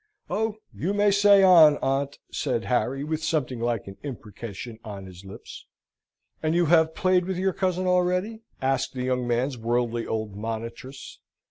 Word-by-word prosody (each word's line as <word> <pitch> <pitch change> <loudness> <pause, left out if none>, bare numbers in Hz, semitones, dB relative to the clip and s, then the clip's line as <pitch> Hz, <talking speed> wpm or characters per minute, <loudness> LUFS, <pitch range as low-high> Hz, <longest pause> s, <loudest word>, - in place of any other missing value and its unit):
"Oh, 220 0 -1 0.2
you 195 +5 -2
may 205 0 +3
say 200 0 +6
on, 160 -6 +7
aunt!" 135 +1 -1
said 115 - -2
Harry, 130 +2 0
with 155 +1 -3
something 145 -6 -1
like 120 -2 -1
an 100 0 -10
imprecation 115 -3 -8
on 100 -3 -8
his 90 0 -12
lips. 95 0 -11 0.7
"And 155 +1 0
have 170 -2 +2 0.2
you 160 - -19
played 185 -1 +2
with 190 -1 -3
your 190 +1 0
cousin 185 0 -1
already?" 180 +4 +1 0.2
asked 135 -1 0
the 125 - -3
young 125 -1 -1
man's 120 +2 -1
worldly 120 0 -1
old 110 -2 -3
monitress. 115 +5 -7
135 Hz, 160 wpm, -25 LUFS, 115-180 Hz, 0.7 s, on